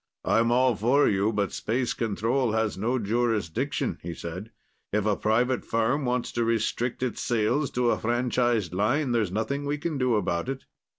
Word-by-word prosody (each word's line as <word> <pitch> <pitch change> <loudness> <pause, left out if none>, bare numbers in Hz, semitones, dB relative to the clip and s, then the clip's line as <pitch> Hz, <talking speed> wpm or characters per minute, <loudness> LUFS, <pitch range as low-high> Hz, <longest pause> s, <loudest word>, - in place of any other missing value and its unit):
"I'm 115 +1 +3
all 125 0 +3
for 125 +8 +3
you, 100 +2 +2
but 105 -2 -1
Space 120 +3 -1
Control 115 +2 0
has 110 -1 0
no 115 +6 0
jurisdiction," 110 -5 -1
he 85 0 -6
said. 90 +7 -7 0.4
"If 105 0 0
a 105 -1 +2
private 120 +5 +1
firm 120 +5 0
wants 125 0 -1
to 120 - 0
restrict 115 +2 -1
its 125 - -2
sales 120 +5 +1
to 125 -1 +2
a - - 0
franchised 120 -4 0
line, 120 +9 +1
there's 110 -6 +1
nothing 125 +8 -2
we 145 +1 -1
can 150 -1 -3
do 125 -3 +2
about 90 +1 -1
it. 135 0 -5
115 Hz, 175 wpm, -26 LUFS, 105-125 Hz, 0.4 s, I'm